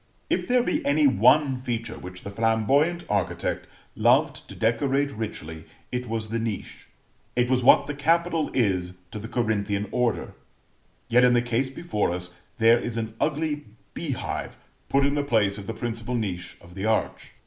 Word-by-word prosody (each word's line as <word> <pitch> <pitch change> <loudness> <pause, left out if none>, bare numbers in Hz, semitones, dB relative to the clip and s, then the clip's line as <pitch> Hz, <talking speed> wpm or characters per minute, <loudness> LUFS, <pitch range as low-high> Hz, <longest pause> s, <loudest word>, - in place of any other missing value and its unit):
If - - 0
there 250 -1 +3
be - - -1
any 145 +1 +3
one 130 +2 +4
feature 120 -3 -4
which 90 0 -10
the 100 - -6
flamboyant 115 +11 +2
architect 100 -4 -1 0.3
loved - - +2
to - - -9
decorate 135 +5 +1
richly, 80 - -6 0.3
it 125 -1 -3
was 110 -1 -3
the 115 +1 -1
niche 110 -3 -5 0.5
it 125 +1 +2
was 130 -1 +3
what - - +7
the 145 - -4
capital 165 +2 +1
is 90 -7 0 0.2
to 105 - -5
the 110 - -7
Corinthian 105 -3 -1
order; 125 -2 0 0.7
yet 125 +2 +4
in 125 0 +6
the 120 - +4
case 120 +2 0
before 135 -7 -1
us 90 +1 -4 0.2
there 115 0 +5
is 120 -1 -4
an 110 -1 -3
ugly 150 -1 -1 0.3
beehive - - -4 0.3
put 140 0 +3
in 140 - +1
the 145 0 0
place 110 -6 +1
of 100 - -9
the - - -2
principal 115 +1 -3
niche 90 -6 -3
of 85 +1 -15
the 95 +3 -4
arch. 110 0 -1
115 Hz, 170 wpm, -25 LUFS, 105-140 Hz, 0.7 s, what